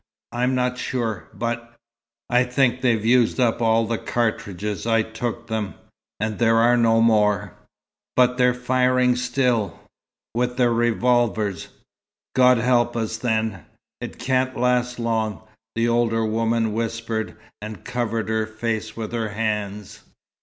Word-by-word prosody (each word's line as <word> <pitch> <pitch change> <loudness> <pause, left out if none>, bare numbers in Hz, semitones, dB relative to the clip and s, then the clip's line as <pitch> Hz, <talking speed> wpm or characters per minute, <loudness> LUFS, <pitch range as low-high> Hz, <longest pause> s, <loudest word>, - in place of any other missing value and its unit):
"I'm 125 +2 0
not 125 0 0
sure. 115 -6 -3
But 120 0 -4 0.5
I 125 0 +3
think 125 0 +1
they've 115 -4 +1
used 120 +1 +3
up 120 -2 +2
all 115 0 +3
the 115 0 -2
cartridges 105 -3 -2
I 115 -1 +3
took 115 +1 -5
them. 110 -4 -3 0.4
And 110 -1 -2
there 115 -1 +4
are 120 +2 +5
no 115 -1 +3
more." 105 -3 +2 0.6
"But 125 0 +4
they're 125 0 +4
firing 125 0 +2
still." 125 -6 0 0.5
"With 125 +1 -1
their 120 -2 +3
revolvers." 115 -4 +1 0.7
"God 125 -1 +6
help 120 0 +2
us, 110 -1 -2
then! 110 -6 -1 0.4
It - - -7
can't 130 +1 0
last 125 0 +1
long," 110 -3 -1 0.3
the 115 +1 +1
older 115 -1 +1
woman 115 0 0
whispered, 115 0 -3 0.2
and 105 -3 -8
covered 120 -3 -2
her 110 -1 0
face 110 0 -4
with 110 -2 -4
her 115 -2 -2
hands. 105 -1 -3
115 Hz, 135 wpm, -23 LUFS, 110-125 Hz, 0.7 s, God